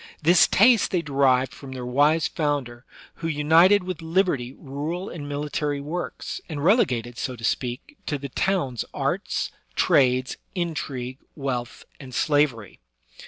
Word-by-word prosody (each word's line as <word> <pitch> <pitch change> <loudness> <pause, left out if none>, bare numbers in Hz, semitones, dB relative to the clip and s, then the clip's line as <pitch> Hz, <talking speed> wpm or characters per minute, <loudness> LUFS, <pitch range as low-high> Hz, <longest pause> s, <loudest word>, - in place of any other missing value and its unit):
This 170 +3 +5
taste 225 +2 +5
they 180 -3 0
derived 135 -3 +2
from 135 -2 -10
their 125 -1 -6
wise 145 +5 +3
founder, 140 -5 -2 0.3
who 165 - -4
united 165 +6 +5
with 180 -2 -5
liberty 160 -7 0
rural 155 +7 -5
and 145 -4 -7
military 145 0 -2
works, 160 +5 -5
and 145 -3 -4
relegated, 125 - +2
so 130 - -3
to 115 - -13
speak, 125 - -2
to 145 - -1
the 140 0 -7
towns 135 - 0
arts, - - -1 0.2
trades, 130 -1 +3 0.2
intrigue, 140 -7 -3 0.2
wealth, 125 -4 -4
and 130 -4 -9
slavery. 145 - +1
145 Hz, 135 wpm, -24 LUFS, 130-165 Hz, 0.3 s, This